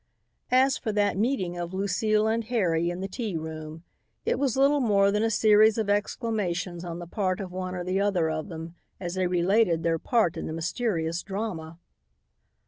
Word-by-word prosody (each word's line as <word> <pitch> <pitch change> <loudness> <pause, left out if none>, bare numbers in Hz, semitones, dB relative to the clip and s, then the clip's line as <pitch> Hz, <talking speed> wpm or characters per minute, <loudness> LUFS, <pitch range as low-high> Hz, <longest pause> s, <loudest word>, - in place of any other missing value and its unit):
As 260 +3 +3
for 225 - -2
that 205 -1 +2
meeting 190 -5 -1
of 175 +1 -4
Lucile 210 +3 +1
and 225 +1 +1
Harry 175 -8 +1
in 175 +1 -4
the 195 - -2
tea 200 -2 -3
room, 160 0 -7 0.4
it - - +1
was 270 -3 0
little 280 +2 +4
more 200 -5 +3
than 210 +1 +1
a 225 - +2
series 215 0 +5
of 215 -2 0
exclamations 200 -5 -2
on 170 -1 -5
the 175 - -7
part 185 +1 -1
of 190 -3 -5
one 185 0 -4
or 180 - -3
the 185 +2 0
other 190 -5 +2
of 155 +4 -3
them 165 0 -7 0.3
as 175 -2 -4
they 185 -1 0
related 180 -1 +2
their 165 -1 +1
part 225 -6 +1
in - - -4
the 155 - -4
mysterious 165 -1 -1
drama. 190 -6 -5
190 Hz, 190 wpm, -27 LUFS, 170-220 Hz, 0.4 s, series